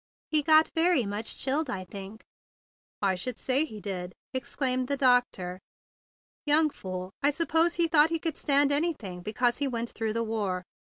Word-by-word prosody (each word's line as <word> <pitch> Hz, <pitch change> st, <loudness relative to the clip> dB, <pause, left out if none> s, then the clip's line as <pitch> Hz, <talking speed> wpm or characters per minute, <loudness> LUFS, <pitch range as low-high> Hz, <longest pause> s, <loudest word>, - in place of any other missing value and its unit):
He 305 Hz, -1 st, +4 dB
got 310 Hz, +1 st, +4 dB
very 330 Hz, -6 st, +3 dB
much 205 Hz, +3 st, -4 dB
chilled, 280 Hz, +2 st, 0 dB
I 185 Hz, -5 st, -4 dB
think." 195 Hz, +3 st, -10 dB, 0.8 s
"I 195 Hz, -1 st, +3 dB
should 225 Hz, +6 st, -4 dB
say 270 Hz, +4 st, +3 dB
he 215 Hz, -9 st, -10 dB
did!" 185 Hz, -3 st, -6 dB, 0.2 s
ejaculated 255 Hz, 0 st, -1 dB
the 280 Hz, +1 st, -1 dB
doctor. 245 Hz, -9 st, +1 dB, 0.8 s
"Young 305 Hz, +1 st, +4 dB
fool! 185 Hz, -3 st, -7 dB
I 285 Hz, -, +4 dB
suppose 325 Hz, +2 st, +1 dB
he 340 Hz, -1 st, +2 dB
thought 315 Hz, -1 st, +5 dB
he 330 Hz, -, -1 dB
could 320 Hz, -1 st, -3 dB
stand 285 Hz, -1 st, +4 dB
anything 285 Hz, -, -1 dB
be¬ 215 Hz, +2 st, -5 dB
cause 245 Hz, 0 st, +1 dB
he 285 Hz, -, +1 dB
went 235 Hz, -2 st, -3 dB
through 225 Hz, -1 st, -3 dB
the 230 Hz, +1 st, -1 dB
war. 205 Hz, -5 st, -2 dB
255 Hz, 175 wpm, -28 LUFS, 205-300 Hz, 0.8 s, thought